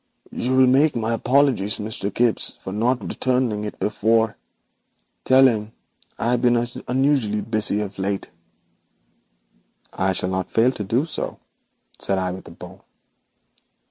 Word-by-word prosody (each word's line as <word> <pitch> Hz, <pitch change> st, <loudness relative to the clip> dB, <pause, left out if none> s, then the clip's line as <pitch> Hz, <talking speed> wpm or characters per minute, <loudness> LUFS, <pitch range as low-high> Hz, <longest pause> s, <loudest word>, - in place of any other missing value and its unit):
'You 130 Hz, +2 st, -1 dB
will 130 Hz, 0 st, +6 dB
make 140 Hz, +4 st, +4 dB
my 115 Hz, 0 st, 0 dB
apologies 125 Hz, -4 st, +2 dB
to 105 Hz, -, -5 dB
Mr. 105 Hz, -1 st, -4 dB
Gibbes 120 Hz, +2 st, 0 dB
for 95 Hz, -, -5 dB
not 115 Hz, +1 st, 0 dB
returning 125 Hz, -5 st, 0 dB
it 105 Hz, -, -6 dB
before. 110 Hz, +1 st, +1 dB, 0.9 s
Tell 130 Hz, +1 st, +6 dB
him 110 Hz, -3 st, -1 dB, 0.4 s
I 115 Hz, -, 0 dB
have 125 Hz, -, +1 dB
been 120 Hz, -1 st, +4 dB, 0.3 s
unusually 130 Hz, -5 st, +1 dB
busy 110 Hz, -1 st, -1 dB
of 100 Hz, -1 st, -6 dB
late.' 95 Hz, 0 st, -3 dB, 1.6 s
'I 95 Hz, 0 st, 0 dB
shall 90 Hz, -, -1 dB
not 95 Hz, -1 st, -2 dB
fail 115 Hz, +3 st, +3 dB
to 110 Hz, -, -5 dB
do 115 Hz, +9 st, 0 dB
so,' 165 Hz, -, -5 dB, 0.6 s
said 95 Hz, -, -1 dB
I, 95 Hz, -1 st, -1 dB
with 95 Hz, +1 st, -9 dB
a -, -, -11 dB
bow. 90 Hz, +3 st, -12 dB
110 Hz, 145 wpm, -22 LUFS, 100-125 Hz, 1.6 s, will